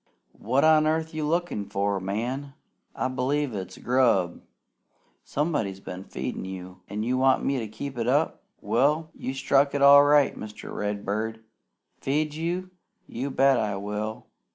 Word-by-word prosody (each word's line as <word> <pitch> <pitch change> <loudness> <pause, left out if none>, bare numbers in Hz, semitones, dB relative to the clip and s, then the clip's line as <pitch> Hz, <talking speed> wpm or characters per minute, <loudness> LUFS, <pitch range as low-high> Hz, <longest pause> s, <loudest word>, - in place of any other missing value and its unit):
"What 130 +6 +1
on 155 -1 +5
earth 160 +1 0
are - - -6
you 150 -1 -1
lookin' 170 -9 -1
for? 100 0 0
Man! 125 +9 -3 0.4
I - - 0
b'lieve 130 +1 -1
it's 95 -2 -6
grub! 120 -9 +2 0.8
Somebody's 140 - -1
been 95 0 -8
feedin' - - -5
you! 95 -1 -8
An' 105 +2 -3
you 125 +3 0
want 130 0 +3
me 135 -1 +1
to 110 - -4
keep 130 +4 -6
it 115 - -1
up? - - +1 0.2
Well, 155 +3 +1
you 130 - -5
struck 140 +1 +2
it 140 - 0
all 140 0 +9
right, 145 -1 +4
Mr. 105 0 -8
Redbird. 105 +2 -3 0.6
Feed 150 +2 0
you? 175 +4 -3 0.3
You 130 +4 -4
bet 135 -1 +4
I 105 -2 -1
will! 105 +2 -4
130 Hz, 155 wpm, -26 LUFS, 105-145 Hz, 0.8 s, all